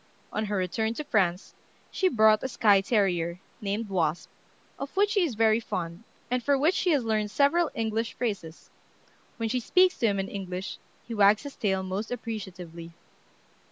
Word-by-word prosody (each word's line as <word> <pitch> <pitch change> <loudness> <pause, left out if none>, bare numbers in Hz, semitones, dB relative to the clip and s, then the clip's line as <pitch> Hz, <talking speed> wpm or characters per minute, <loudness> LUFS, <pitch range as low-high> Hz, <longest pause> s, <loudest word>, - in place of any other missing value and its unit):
On 215 - -1
her 205 -1 -2
return 220 +5 -1
to 300 - -4
France 190 -8 0 0.4
she 375 - +2
brought 220 -5 +5
a - - -2
skye 205 -6 +4
terrier, 180 -5 0 0.2
named 210 +2 -2
"Wasp," 170 -4 -1 0.5
of 280 +7 -7
which 410 +1 +3
she 405 -4 +3
is 290 -9 -1
very 220 0 +4
fond, 175 -3 -5 0.3
and 250 0 +1
for 280 +3 +2
which 310 +6 +3
she 370 - 0
has 290 -6 +3
learned 215 -2 0
several 290 +8 +3
English 225 -1 -1
phrases. 200 -9 -5 0.7
When 230 -2 -1
she 250 +3 0
speaks 365 +9 +3
to 230 - +3
him 200 -2 0
in 195 - -2
English, 190 -1 -5 0.3
he 235 - -5
wags 205 +1 +4
his 285 -1 -8
tail 190 -3 0
most 190 +4 -4
appreciatively. 185 -8 -7
215 Hz, 175 wpm, -27 LUFS, 190-245 Hz, 0.7 s, brought